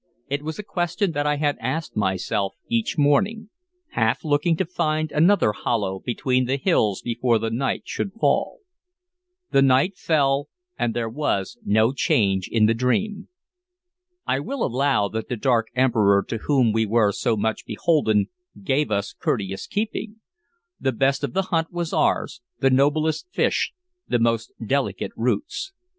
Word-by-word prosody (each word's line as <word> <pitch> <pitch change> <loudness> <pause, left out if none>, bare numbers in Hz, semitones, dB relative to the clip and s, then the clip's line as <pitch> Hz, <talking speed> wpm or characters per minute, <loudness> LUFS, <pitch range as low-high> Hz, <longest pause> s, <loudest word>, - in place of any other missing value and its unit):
It 140 +1 -1
was 155 +1 -5
a 210 - -5
question 175 0 -1
that 145 -1 -1
I 150 - +2
asked 150 +2 -2
myself 95 -1 -1
each 230 -5 -1
morning, 200 +10 +2 0.4
half 110 +3 +1
looking 155 +2 +2
to 190 - 0
find 155 -3 -1
another 165 - +4
hollow 100 -4 -2
between 125 +1 0
the 130 +2 0
hills 110 - +1
before 120 0 +1
the 110 +1 -2
night 130 +4 -1
should 195 - -4
fall. 230 - 0 0.9
The 135 - +4
night 135 +8 +3
fell, 140 -4 +1 0.3
and 115 - -1
there 120 -1 -1
was 110 -6 -2
no 110 +4 +3
change 95 -8 +1
in 110 -2 +4
the 110 - +4
dream. 200 - -1 1.0
I 135 - 0
will 260 - -2
allow 130 -4 +1
that 110 +1 -5
the 125 - -2
dark 115 -1 +2
Emperor 110 -6 +3
to 115 - -2
whom 125 -4 +2
we 110 0 +1
were 105 -1 +3
so 115 +2 0
much 110 +1 -1
beholden 110 -5 +2 0.4
gave 135 +4 +1
us 100 -1 -1
courteous 95 -3 -2
keeping. 215 +1 -3 0.6
The 130 - 0
best 135 +3 +1
of 145 - -2
the 195 +1 +1
hunt 165 0 +1
was 175 -2 -3
ours, 115 - 0 0.2
the 135 - +3
noblest 150 - +2
fish, - - +1 0.4
the - - +2
most 115 -1 0
delicate 110 -6 -1
roots. 305 - -2
135 Hz, 155 wpm, -23 LUFS, 110-155 Hz, 1.0 s, another